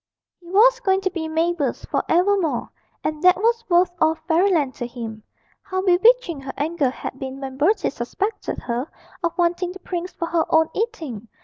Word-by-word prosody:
He 350 - -18
was 475 +6 +5
going 385 -4 +1
to 380 -1 -1
be 330 -3 -3
Mabel's 320 -4 -1
for - - -1
evermore, 355 -6 +2 0.3
and 305 -1 -2
that 365 -1 +6
was 465 +3 +1
worth 350 0 +4
all 315 0 +4
Fairyland 330 -5 +2
to 240 - -3
him. 230 -3 -7 0.4
How 375 -1 -3
bewitching 375 - +4
her 265 - -6
anger 295 -1 0
had 260 +1 -7
been 265 0 -6
when 265 -1 -6
Bertie 365 +8 +2
suspected 385 - -3
her 245 +4 -3 0.3
of 340 +1 -1
wanting 350 +1 0
the 385 - -10
prince 360 0 -4
for 340 - -4
her 335 -1 +1
own 320 0 +4
eating. 315 - -4
340 Hz, 180 wpm, -22 LUFS, 280-380 Hz, 0.4 s, that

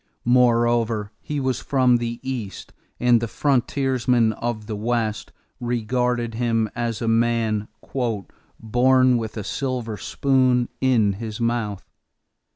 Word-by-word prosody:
Moreover, 120 -3 +2
he 150 -1 -3
was 130 -2 -1
from 130 -4 +3
the 120 0 -4
East 120 -7 -5 0.3
and 120 -2 +4
the 115 - -1
frontiersmen 125 -3 +1
of 115 -2 -4
the 110 -1 -4
West 110 0 -2 0.3
regarded 120 0 -1
him 115 -1 0
as 120 -1 -2
a - - -1
man 115 -2 +1 1.0
"born 130 +2 +4
with 110 0 -5
a 105 - -3
silver 125 -3 -3
spoon 130 +4 +1
in 115 -6 +3
his 110 0 -5
mouth." 115 -4 -2
120 Hz, 120 wpm, -23 LUFS, 110-125 Hz, 1.0 s, and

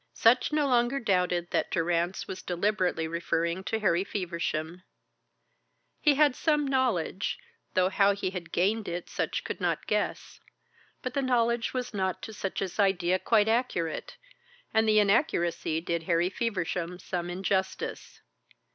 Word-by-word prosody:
Sutch 245 +5 +4
no 300 -1 +2
longer 245 +1 +2
doubted 180 -6 0
that - - 0
Durrance 175 +2 0
was 190 - -6
deliberately 180 -2 0
referring 170 +2 -1
to 225 - 0
Harry 185 -4 +2
Feversham. 170 -3 -3 1.2
He 295 -2 +4
had 290 -2 +4
some 300 -1 +1
knowledge, 245 -9 0 0.4
though 185 -1 +4
how 200 +1 +4
he 190 -2 -2
had 180 -3 -7
gained 205 +4 +1
it 175 0 -4
Sutch - - -2
could - - -5
not - - 0
guess. - - -2 0.6
But 255 - -3
the 275 - 0
knowledge 235 -2 +1
was 250 -1 -3
not 190 -2 -2
to 220 - -6
Sutch's 195 -1 -4
idea 185 -2 +2
quite 215 0 +3
accurate, 220 -9 -1 0.6
and 220 0 +3
the 215 - +4
inaccuracy 195 - +2
did 170 0 -2
Harry 170 +2 +1
Feversham 180 -6 -2
some 175 -1 -4
injustice. 190 +1 -2
190 Hz, 140 wpm, -28 LUFS, 175-230 Hz, 1.2 s, Sutch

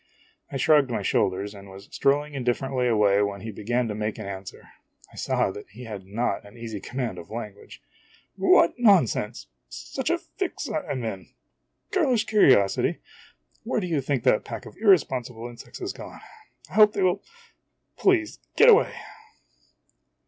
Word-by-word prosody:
I 140 - -3
shrugged 145 0 +4
my 115 -4 -2
shoulders 95 +2 0
and 100 -1 -12
was 95 +1 -12
strolling 145 +2 +1
indif 125 -3 0
ferently 130 -2 -1
away 105 -3 +3
when 100 -1 -2
he 110 - -6
began 120 +4 -1
to 105 - -3
make 105 0 -3
an - - -7
answer. 95 -1 -8 0.4
I - - -16
saw - - 0
that 105 - -10
he 110 +5 -11
had 105 -5 -8
not 115 +5 -2
an 100 +3 -15
easy 115 -3 -6
command 125 +3 -4
of 85 - -12
lan 110 -2 -6
guage. 100 - -15 0.5
"What 170 - +4
nonsense! 170 - +3 0.2
such - - -5
a - - +2
fix - - -5
I - - -3
'm 130 -4 -3
in! 95 -4 -5 0.6
Girlish 280 - +2
curiosity? 130 - +3 0.7
Where 230 0 -1
do 195 - -3
you 160 -5 0
think 135 -3 -1
that 105 - +3
pack - - -7
of - - -12
irresponsible 130 - +2
insects 120 -1 -11
has 375 +1 -5
gone? - - -10 0.5
I - - -17
hope 210 -1 +6
they 195 - 0
will 180 -1 +2 0.7
Please 365 -5 +1 0.2
get 470 - +7
away!' 460 +1 +5
120 Hz, 170 wpm, -25 LUFS, 105-155 Hz, 0.7 s, get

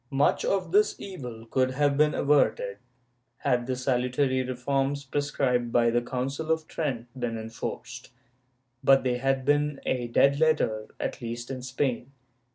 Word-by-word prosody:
^ - - -47
Much 140 +1 +2
of 185 -4 0
this 210 +3 +4
evil 125 - -8
would 130 -1 +3
have 140 +2 +1
been 150 +1 +3
averted 135 -8 +2 0.6
had 125 -3 0
the 130 - -1
salutary 130 +1 +1
reforms 135 +2 -1
prescribed 130 -4 0
by 115 -1 +3
the 120 +1 +2
Council 135 +6 -3
of 160 -1 0
Trent 130 -7 -3
been 120 -2 -2
enforced,^ 110 0 -6 0.7
but 135 0 +5
they 125 -1 +1
had 135 0 0
been 145 0 +2
a 125 -2 -1
dead 140 +4 +3
letter, 130 -9 +2
at - - -3
least 120 +1 -5
in 130 -1 -5
Spain. 125 0 -2
130 Hz, 155 wpm, -27 LUFS, 120-145 Hz, 0.7 s, but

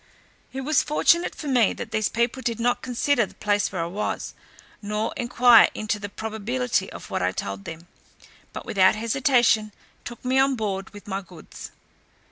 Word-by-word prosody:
It 265 - -5
was 300 +3 +2
fortunate 340 +3 +2
for 300 - -7
me 245 -6 +3
that 225 - -7
these 215 -1 0
people 235 +3 -1
did 235 -2 -2
not 245 +1 +1
consider 245 -2 +1
the - - -18
place 205 -1 0
where 180 -4 -2
I - - -2
was, 190 +5 -4 0.5
nor 210 +1 -2
enquire 240 -1 +6
into 215 0 -2
the 205 0 -6
probability 220 0 -2
of - - -10
what - - -1
I 90 0 +1
told 100 +1 -5
them; 165 +2 -9 0.6
but - - -8
without 190 -1 +4
hesitation 230 -2 +2 0.3
took 240 +1 -9
me 260 +1 +2
on 270 0 +3
board 195 -4 -3
with 205 0 -13
my 195 0 -3
goods. 175 -3 -11
220 Hz, 175 wpm, -24 LUFS, 200-250 Hz, 0.6 s, enquire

